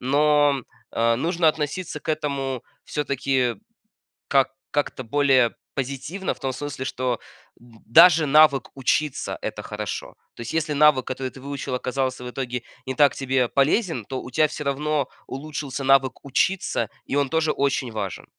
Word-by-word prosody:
но, 145 0 +3 0.3
а, 115 0 +2
нужно 170 +4 0
относиться 155 +1 -2
к - - -14
этому 140 -5 -2 0.2
всё-таки 135 -4 0 0.7
как 135 -1 +3 0.2
как-то 145 -2 -1
более 130 -2 +3 0.2
позитивно, 140 +8 -3
в - - -19
том 135 - -1
смысле, 140 0 -5
что 125 -3 -2 0.4
д 115 -2 -19
даже 165 +5 +7
навык 150 -1 +5
учиться- 140 +2 0
это - - -4
хорошо. - - -5 0.2
То - - -9
есть, 115 - -5
если 155 -2 0
навык, 145 -3 +5
который 130 0 -3
ты - - -13
выучил, 140 -1 -4
оказался 130 0 -2
в 125 - -5
итоге 125 -1 -4 0.2
не 130 - -3
так 145 +2 +4
тебе 130 -2 +1
полезен, 145 - +1
то 130 - -4
у - - -9
тебя 155 +4 +3
всё - - -6
равно 145 0 0 0.2
улучшился 140 -1 -5
навык 135 -1 +3
учиться, 180 +7 0 0.2
и 140 - -3
он 140 -2 +2
тоже 160 -1 +1
очень 140 -2 0
важен. 100 -4 -4
140 Hz, 155 wpm, -24 LUFS, 130-150 Hz, 0.7 s, даже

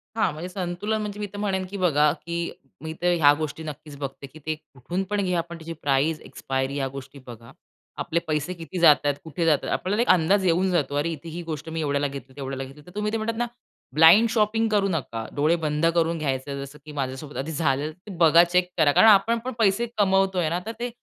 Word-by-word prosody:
हां. 225 - +2
म्हणजे 165 +4 -6
संतुलन 185 +4 -2
म्हणजे 210 -1 -5
मी 210 - -2
तर 205 - -7
म्हणेन 195 -2 -1
की 200 - -6
बघा, 150 -5 +3
की 170 +1 -4 0.3
मी 160 0 -5
तर 175 0 +3
ह्या 145 -3 +6
गोष्टी 155 0 -4
नक्कीच 150 -1 -8
बघते, 140 0 -6
की 150 +4 -15
ते 155 0 -1 0.2
कुठून 175 +9 -3
पण 205 -1 0
घ्या. 180 -2 +1
पण 170 +1 -10
त्याची 165 0 -7
प्राईझ, 145 +3 +1
एक्सपायरी 135 0 -3
ह्या 135 -2 -1
गोष्टी 135 +1 -9
बघा. 115 -1 -11 0.5
आपले 170 - -1
पैसे 155 +3 -1
किती 175 +1 -7
जात 160 -3 +8
आहेत, 145 -1 +2
कुठे 165 +1 -3
जात 155 -3 +5
आहेत? - - -2
आपल्याला 205 +5 0
एक 240 - 0
अंदाज 185 +3 +4
येऊन 180 +2 +2
जातो. 145 -5 0
अरे 145 +3 0
इथे 160 +1 -7
ही 170 +2 -6
गोष्ट 160 -1 -6
मी 160 0 -3
एवढ्याला 145 -1 0
घेतली, 135 -1 -9
तेवढ्याला 135 -1 -5
घेतली. 135 +3 -12
तर 180 - -13
तुम्ही 210 0 -1
ते 225 - 0
म्हणतात 225 +1 -3
ना, 240 - 0 0.5
ब्लाइंड 170 +9 +7
शॉपिंग 225 0 +2
करू 205 -2 +2
नका. 120 -9 -3
डोळे 150 +4 +3
बंद 150 +1 0
करून 165 0 +2
घ्यायचं. 140 -2 -3
जसं 140 +2 -11
की 155 - -9
माझ्यासोबत 140 +1 -5
आधी 140 +4 -3
झालेलं, 150 -1 0
ते 180 +6 -13
बघा. 165 0 +7
चेक 180 +1 +1
करा. 155 -3 +5
कारण 220 - +6
आपण 220 +3 +5
पण 255 - -3
पैसे 215 +1 +3
कमवतोय 190 -4 +2
ना. 170 +2 -1
तर 225 - -3
ते 245 +1 -2
165 Hz, 230 wpm, -25 LUFS, 145-190 Hz, 0.5 s, जात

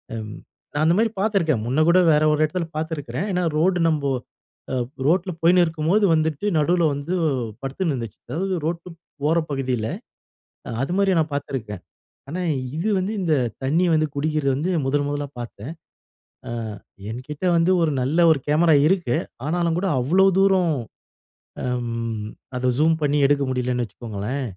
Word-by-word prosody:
அம் 110 -1 -6 0.4
நான் 150 - +1
அந்த 165 +2 +4
மாரி 225 +1 +3
பாத்துருக்கேன். 190 - +1
முன்ன 130 +5 0
கூட 185 +2 +6
வேற 150 0 +4
ஒரு 150 - 0
எடத்ல 165 +2 -3
பாத்திருக்கிறேன். 160 +4 -3
ஏன்னா, 180 -1 0
ரோடு 180 +3 +2
நம்போ, 145 -3 +1 0.6
அ - - +1 0.3
ரோட்ல 180 +3 +2
போயின்னு 175 +2 +5
இருக்கும்போது 165 +6 +1
வந்துட்டு 155 +2 0
நடுவுல 170 +2 +3
வந்து 145 +5 -4 0.5
படுத்துன்னு 145 +5 -1
இருந்துச்சு. 115 -4 -7
அதாவது 185 +8 -2
ரோட்டுப் 170 0 -4 0.2
போற 160 +3 +3
பகுதியில 125 -5 -1 0.9
அது 135 - -2
மாரி 195 -2 +3
நான் 155 -2 -1
பாத்துருக்கேன். 115 -9 -4 0.5
ஆனா, 170 +5 -4 0.4
இது 185 +7 0
வந்து 190 +3 -2
இந்த 170 -4 +1 0.3
தண்ணி 155 +7 +2
வந்து 155 0 +2
குடிக்கிறது 150 -1 0
வந்து 160 +7 -1 0.2
முதல் 145 +1 +1
முதலா 145 0 -3
பாத்தேன். 120 +4 -8 0.8
அ - - -5 0.6
என்கிட்டே 140 +9 -5
வந்து 165 +2 +3
ஒரு 160 - +2
நல்ல 140 +6 0
ஒரு 155 - +1
கேமரா 160 +1 +4
இருக்கு. 175 -10 +1 0.3
ஆனாலும் 170 +1 0
கூட 195 - -1
அவ்ளோ 180 +10 +4
தூரம் 190 -4 +3 0.9
அம் 115 -3 -3 0.3
அத 125 0 0
ஜூம் 160 +2 +4
பண்ணி 145 0 +2
எடுக்க 140 0 +2
முடியலன்னு 125 -1 -1
வச்சுக்கோங்களேன். 110 +4 -5
155 Hz, 150 wpm, -23 LUFS, 135-175 Hz, 0.9 s, கூட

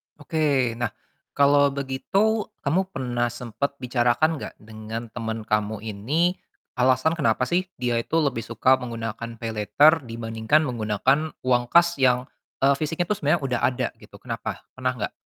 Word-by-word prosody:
Oke 145 -5 +1
nah, 120 - +1 0.5
kalau 140 0 +5
begitu 165 +11 0 0.2
kamu 180 +7 +1
pernah 120 -6 -1
sempat 120 +3 -4
bicarakan 125 +6 +2
gak - - -7
dengan 110 +1 -8
teman 110 -1 -4
kamu 105 -1 -1
ini, 140 - 0 0.4
alasan 130 +4 +3
kenapa 115 -4 +2
sih 175 +8 0
dia 120 -2 0
itu 115 - -3
lebih 135 -5 0
suka 130 0 +3
menggunakan 115 -1 -5
paylater 115 +8 +3
dibandingkan 115 +5 0
menggunakan 125 +5 0
uang 125 -1 +2
kas 170 -1 +4
yang, 125 -1 +3 0.4
eee, 140 +1 +6
fisiknya 165 +3 -1
itu 210 - +2
sebenarnya 150 +3 +2
udah 125 -3 0
ada 130 0 +1
gitu - - -16
kenapa? - - -5
Pernah 130 -1 -1
gak? 105 -4 -3
125 Hz, 145 wpm, -24 LUFS, 115-145 Hz, 0.5 s, eee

